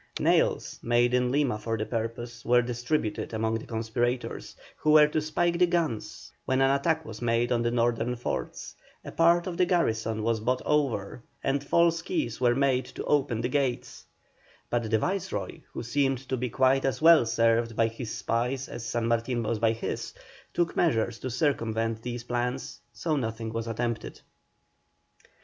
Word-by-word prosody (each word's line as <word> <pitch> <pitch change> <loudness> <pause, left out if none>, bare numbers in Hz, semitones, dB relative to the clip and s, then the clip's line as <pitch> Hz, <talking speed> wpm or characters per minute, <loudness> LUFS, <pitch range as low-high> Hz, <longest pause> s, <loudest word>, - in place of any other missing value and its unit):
Nails, - - +1
made 120 +1 +2
in 125 0 +2
Lima 135 -6 +1
for 115 0 -2
the 110 - -2
purpose, 115 +1 -4
were 120 0 +4
distributed 120 -1 -2
among 110 0 0
the - - -11
conspirators, 120 +2 -2 0.2
who 155 - -1
were 155 -1 +8
to 155 +1 -1
spike 170 +3 0
the 180 - +5
guns 165 -11 -2
when 130 0 0
an 135 0 +4
attack 160 +3 +1
was 110 - -9
made 120 +1 +1
on 120 -1 +2
the 120 - +1
northern 120 0 0
forts; 120 - -4 0.3
a - - -6
part 170 +1 +4
of 180 -3 -4
the 180 - +4
garrison 115 - 0
was 115 0 +1
bought 125 +4 -1
over, 130 -8 0 0.2
and 140 +1 0
false 165 +2 +3
keys 310 - -3
were 120 -1 +4
made 130 -2 +2
to - - -7
open 130 -6 +1
the 120 - 0
gates; 130 -2 -2 0.7
but 120 -2 0
the 110 - +3
Viceroy, 190 - -3
who - - -5
seemed 135 +2 +1
to 130 - -1
be 125 0 -2
quite 130 +2 +3
as 135 - 0
well 165 -2 +7
served 115 0 +1
by 115 - +3
his 115 +1 -5
spies 125 +4 -1
as 120 - -7
San 115 0 -2
Martin 115 +1 0
was 110 0 -1
by 115 0 +3
his, 115 0 -4 0.4
took 175 -1 0
measures 115 -8 +1
to 130 - -4
circumvent 115 -4 0
these 120 0 -5
plans, 125 +2 -3
so 155 +7 -2
nothing 115 -4 -3
was 115 0 -3
attempted. 115 0 -3
120 Hz, 175 wpm, -27 LUFS, 115-140 Hz, 0.7 s, were